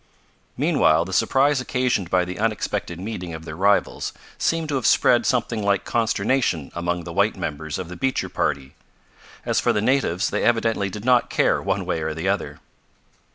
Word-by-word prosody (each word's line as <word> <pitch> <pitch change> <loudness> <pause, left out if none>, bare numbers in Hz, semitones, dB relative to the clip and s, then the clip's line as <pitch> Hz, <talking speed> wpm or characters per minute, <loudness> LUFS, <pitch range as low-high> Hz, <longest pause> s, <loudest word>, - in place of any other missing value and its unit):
Meanwhile 80 +2 +3
the 95 - -7
surprise 135 +7 +3
occasioned 125 -8 -1
by 90 -1 +2
the 90 +2 -6
unexpected 105 -5 -2
meeting 90 -4 -5
of 80 0 -9
their 80 - -7
rivals 100 +4 +1 0.3
seemed 165 -1 0
to 145 - -1
have 130 - 0
spread 120 - +4
something 115 -3 0
like 100 -1 +1
consternation 115 - 0
among 85 0 -2
the - - -7
white - - +1
members 75 +1 -4
of 95 - -5
the 90 - -8
Beecher 130 +9 -1
party. 70 -1 -2 0.7
As - - +1
for - - +2
the - - 0
natives 105 -6 +1
they - - -1
evidently 115 -4 +1
did 105 +3 -8
not 125 -1 +3
care - - +2
one - - -1
way 80 - -2
or 80 0 -3
the 80 +4 -3
other. 100 +1 -2
100 Hz, 180 wpm, -23 LUFS, 85-120 Hz, 0.7 s, spread